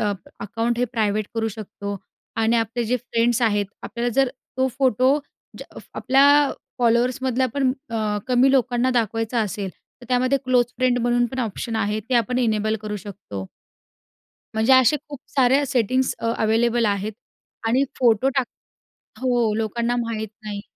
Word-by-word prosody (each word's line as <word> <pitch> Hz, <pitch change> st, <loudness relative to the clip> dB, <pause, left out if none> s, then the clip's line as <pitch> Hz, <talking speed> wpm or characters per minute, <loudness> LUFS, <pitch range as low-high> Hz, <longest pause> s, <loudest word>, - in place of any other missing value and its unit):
Up 205 Hz, -3 st, -2 dB
account 230 Hz, +3 st, -2 dB
हे 245 Hz, -, +3 dB
private 215 Hz, -2 st, 0 dB
करू 225 Hz, -1 st, 0 dB
शकतो 200 Hz, -1 st, -6 dB, 0.4 s
आणि 225 Hz, +1 st, +2 dB
आपले 230 Hz, +1 st, -1 dB
जे 245 Hz, +3 st, +1 dB
फ्रेंड्स 240 Hz, -1 st, 0 dB
आहेत, 205 Hz, -3 st, +2 dB, 0.2 s
आपल्याला 235 Hz, +1 st, -2 dB
जर 270 Hz, -1 st, +3 dB, 0.3 s
तो 260 Hz, 0 st, +2 dB
फोटो 260 Hz, +2 st, +3 dB, 0.4 s
ज -, -, -6 dB, 0.3 s
आपल्या 280 Hz, +2 st, +4 dB, 0.3 s
फॉलोअर्समधल्या 250 Hz, +2 st, +2 dB
पण 270 Hz, -2 st, +2 dB, 0.2 s
अ, 215 Hz, -2 st, -1 dB
कमी 255 Hz, +2 st, +4 dB
लोकांना 250 Hz, -1 st, +2 dB
दाखवायचा 225 Hz, 0 st, 0 dB
असेल 200 Hz, -2 st, -3 dB
तर 245 Hz, -, -19 dB
त्यामध्ये 255 Hz, +2 st, +2 dB
क्लोज 250 Hz, -1 st, +4 dB
फ्रेंड 250 Hz, -1 st, +2 dB
म्हणून 240 Hz, 0 st, +2 dB
पण 260 Hz, +3 st, -7 dB
ऑप्शन 225 Hz, 0 st, -3 dB
आहे, 210 Hz, 0 st, 0 dB
ते 235 Hz, +4 st, -3 dB
आपण 240 Hz, +1 st, +2 dB
इनेबल 220 Hz, -2 st, +1 dB
करू 210 Hz, -1 st, -4 dB
शकतो. 190 Hz, -, -8 dB, 1.1 s
म्हणजे 220 Hz, +4 st, +3 dB
असे 260 Hz, +3 st, +6 dB
खूप 285 Hz, -2 st, -7 dB
साऱ्या 270 Hz, +1 st, +3 dB
सेटिंग्स 255 Hz, 0 st, +1 dB
अ, -, -, -3 dB
अव्हेलेबल 230 Hz, +2 st, +2 dB
आहेत 205 Hz, +1 st, -1 dB, 0.5 s
आणि 245 Hz, +4 st, +3 dB, 0.2 s
फोटो 240 Hz, +1 st, +3 dB
टाक 260 Hz, -2 st, +2 dB, 0.8 s
हो, 240 Hz, -4 st, +2 dB
लोकांना 235 Hz, +2 st, -1 dB
माहीत 225 Hz, -2 st, -3 dB, 0.2 s
नाही. 205 Hz, -1 st, -5 dB
235 Hz, 150 wpm, -23 LUFS, 215-255 Hz, 1.1 s, असे